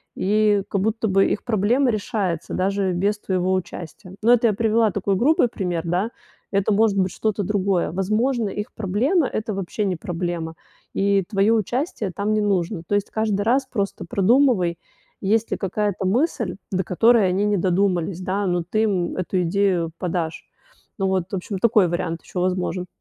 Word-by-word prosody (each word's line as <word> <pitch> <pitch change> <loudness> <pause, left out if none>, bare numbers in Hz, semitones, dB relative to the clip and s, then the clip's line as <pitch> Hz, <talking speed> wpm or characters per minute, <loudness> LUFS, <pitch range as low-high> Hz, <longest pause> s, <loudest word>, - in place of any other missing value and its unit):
и 210 +1 +2
как 200 - 0
будто 220 +2 0
бы 195 0 +3
их 205 - -2
проблема 240 +4 +2
решается 205 -6 -2
даже 195 0 0
без 200 +4 0
твоего 185 -2 0
участия. 180 0 -6
Но 235 +3 +5
это 235 -1 +4
я 215 - +2
привела 225 +1 +2
такой 200 0 0
грубый 255 +4 +3
пример, 180 -6 -2
да. 185 +7 -1 0.4
Это 200 +1 +1
может 210 -1 +3
быть 185 -1 +1
что-то 215 -2 -1
другое. 195 -3 0
Возможно, 215 +5 0
их 210 +4 -5
проблема 245 - +1
это 215 0 -3
вообще 195 +2 -3
не 185 - 0
проблема. 170 -1 -4 0.4
И 195 -1 +2
твоё 205 +1 +3
участие 225 - -2
там 205 +3 -1
не 215 - +2
нужно. 190 -3 0
То 205 - +1
есть, 205 0 -1
каждый 215 -2 0
раз 255 +5 +2
просто 200 -6 -3
продумывай, 195 -3 +2 0.4
есть 215 +3 +1
ли - - 0
какая-то 200 0 -2
мысль, 240 - 0 0.2
до 190 -1 0
которой 225 +2 +4
они 190 +3 0
не 210 -1 +2
додумались, 180 -1 0
да, 190 +2 -1
но 175 -1 0
ты 215 +6 0
им 190 -5 0
эту 185 0 -1
идею 175 -2 +1
подашь. 170 -2 -3 0.5
Ну 195 - -1
вот, 190 -2 0
в 195 - -1
общем, 190 +1 -4
такой 210 -3 +4
вариант 170 -1 -3
ещё 180 - -4
возможен. 180 0 -1
200 Hz, 175 wpm, -22 LUFS, 185-215 Hz, 0.5 s, Но